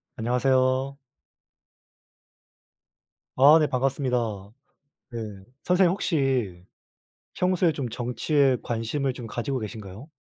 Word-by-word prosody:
안녕하세요. 130 +3 +1 2.4
아, 145 +5 +7
네. 155 - +2
반갑습니다. 130 -1 0 0.9
네. 120 - -5 0.4
선생님 180 -1 +3
혹시 135 - -1 0.7
평소에 180 -2 +2
좀 135 -5 -4
정치에 125 +3 +1
관심을 120 +4 -2
좀 120 -2 -8
가지고 125 +4 -3
계신가요? 105 +2 -8
130 Hz, 210 characters per minute, -25 LUFS, 120-145 Hz, 2.4 s, 아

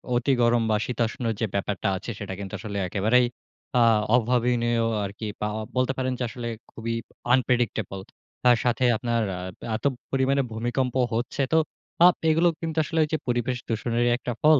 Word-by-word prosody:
অতি 125 +3 +2
গরম 120 0 +4
বা 105 - +3
শীতাষ্ণ 120 0 -2 0.2
যে, 115 - +1
ব্যাপারটা 100 +1 -1
আছে 105 +5 -6
সেটা 100 -2 -5
কিন্তু 100 +1 -7
আসলে 100 +1 -5
একেবারেই 110 +7 +3 0.5
আ - - +5 0.3
অভাবনীয় 120 -1 +2 0.2
আরকি 100 +3 -6
পা 105 - +1 0.3
বলতে 130 +1 +2
পারেন 130 -1 0
যে, - - -1
আসলে 120 +1 -6 0.2
খুবই 115 0 -4 0.4
unpredictable 120 -6 0 0.4
তার 125 -1 +6
সাথে 125 +1 +1
আপনার 115 0 0 0.2
আ - - -5 0.4
এত 110 - -6 0.3
পরিমাণে 135 +1 +2
ভূমিকম্প 120 +3 -1 0.2
হচ্ছে 120 +4 -1
তো - - +6 0.5
আপ 180 - +5
এগুলো 165 +2 +4
কিন্তু 165 -1 -4
আসলে 160 +1 -2
ঐযে 155 +1 -1
পরিবেশ 120 +1 0
দূষণেরই 120 +1 +1
একটা 125 - -4
ফল। 155 -2 +7
120 Hz, 160 wpm, -25 LUFS, 110-130 Hz, 0.5 s, ফল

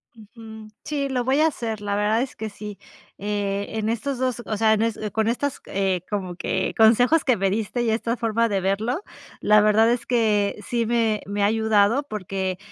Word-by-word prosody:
Ujú. 220 0 -12 0.2
Sí, 285 -2 -2
lo 255 -2 -1
voy 265 +4 +2
a 320 - +5
hacer. 225 -8 -4
La 205 -1 -2
verdad 210 +3 +1
es 270 - -7
que 220 -1 -5
sí, 210 0 -9 0.4
eh, 200 0 -2
en 220 0 -1
estos 240 +4 -2
2 255 -1 -1
o 215 - -3
sea, 220 0 +4
en 215 - +1
es 225 -1 0
con 220 0 0
estas, 260 +4 -1
eh, 190 -2 0
como 190 -4 -3
que 175 - -2
consejos 245 +8 +5
que 255 -4 +2
me 195 0 +1
diste 220 +3 -2
y 235 - 0
esta 230 +2 -1
forma 230 0 +1
de 200 -2 0
verlo. 220 - -1 0.4
La 210 0 +5
verdad 215 +2 +4
es 240 0 -1
que 215 -4 +1
sí 235 -1 -1
me 225 -2 +1
me 200 0 -1
ha - - +5
ayudado 220 +3 +2
porque 190 -2 -3
220 Hz, 205 wpm, -23 LUFS, 205-235 Hz, 0.4 s, a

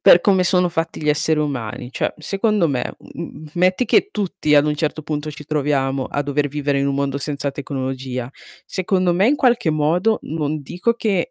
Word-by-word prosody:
per 175 - +8
come 190 -3 +3
sono 180 0 +3
fatti 165 -1 -3
gli 150 - -2
esseri 150 +1 +2
umani, 130 -4 -3
cioè - - -1
secondo 195 +2 +1
me, 130 -3 -2
mhmm, 170 0 -9
m - - -9
metti 185 +7 +3
che 400 +6 +3
tutti 185 -6 0
ad 145 - +5
un 150 - +1
certo 155 +1 -2
punto 150 0 -3
ci 150 0 -10
troviamo 135 -3 0
a 145 - -2
dover 145 0 0
vivere 145 -1 -1
in 140 - +1
un 140 - 0
mondo 140 0 -1
senza 140 0 -3
tecnologia. 130 -3 -4 0.4
Secondo 185 -1 +1
me 195 +6 +4
in 295 - +3
qualche 240 - +3
modo 170 +9 +2
non 155 -1 -2
dico 180 - -1
che 205 -6 0
150 Hz, 195 wpm, -20 LUFS, 140-180 Hz, 0.4 s, per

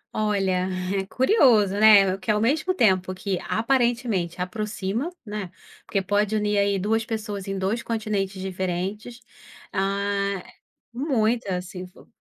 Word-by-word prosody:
Olha, 195 -4 +1 0.3
é 190 0 -2
curioso, 245 - +4
né. 200 -3 +6
Que 215 - -9
ao 210 0 +3
mesmo 305 +10 +1
tempo 185 - +3
que 190 -1 -2
aparentemente 230 -7 0
aproxima, 210 - -3 0.2
né. 210 -3 -5 0.4
Porque 195 -2 -1
pode 205 +2 +1
unir 210 -1 0
aí 200 0 +2
2 220 +4 0
pessoas 210 -3 -5
em 195 - -3
2 195 +5 -1
continentes 210 -4 -2
diferentes. 190 +5 -4 0.5
Ah 200 0 -1 0.5
muita 230 - 0
sim 185 -1 -8
flo 180 - -19
205 Hz, 130 wpm, -24 LUFS, 190-225 Hz, 0.5 s, né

